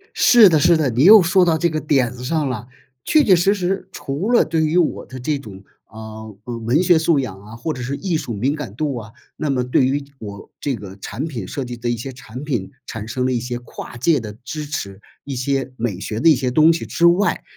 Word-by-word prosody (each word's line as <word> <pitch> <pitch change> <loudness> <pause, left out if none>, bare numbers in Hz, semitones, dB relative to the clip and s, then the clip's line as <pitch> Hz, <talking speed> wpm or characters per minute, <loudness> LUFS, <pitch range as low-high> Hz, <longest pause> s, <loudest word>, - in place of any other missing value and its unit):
是 230 -5 +7
的 160 -3 +3
是 170 +3 +5
的， 150 -4 +1
你 120 +3 +1
又 210 +4 +9
说 180 +1 +4
到 165 -2 +2
这 170 +2 +1
个 155 -1 -2
点 135 -5 +1
子 125 0 -9
上 150 +1 -1
啦！ 120 -2 -5 0.4
确 310 - +4
确 195 -8 +5
实 180 +4 +3
实 190 -1 -2
除 150 - -3
了 240 - +5
对 160 -1 0
于 155 +3 +1
我 175 -3 +1
的 130 - -9
这 145 +4 -1
种， 100 -7 -11 0.2
啊， 110 0 -10 0.2
呃， 120 -1 -5
文 115 +8 +1
学 175 -2 +5
素 160 -2 +2
养 105 -8 -5
啊， 105 +2 -12
或 155 +7 -3
者 125 - -7
是 130 +3 -3
艺 175 0 -1
术 120 - -5
敏 130 +8 0
感 135 -10 -7
度 145 +1 -2
啊， 110 -1 -8 0.2
那 155 - -3
么 130 -2 +1
对 125 +1 +2
于 140 +2 0 0.2
我 100 -2 -9
这 140 -3 -2
个 100 -3 -10
产 100 +8 -5
品 115 - -6
设 140 - -4
计 120 -1 -7
的 120 +1 -3
一 120 - -1
些 130 +4 -6
产 125 0 -10
品， 120 -10 -3 0.2
产 110 -1 -6
生 125 +2 -2
了 130 - +1
一 125 - 0
些 120 0 -4
跨 120 0 -10
界 150 +5 +2
的 105 -3 -7
支 150 +4 -5
持， 100 -10 -5 0.3
一 140 - -5
些 135 +1 -1
美 110 -6 -3
学 105 +2 -4
的 165 - +5
一 155 - +6
些 125 0 -1
东 155 +5 +5
西 165 - -4
之 170 - 0
外。 175 +4 +3
135 Hz, 270 characters per minute, -20 LUFS, 115-160 Hz, 0.4 s, 又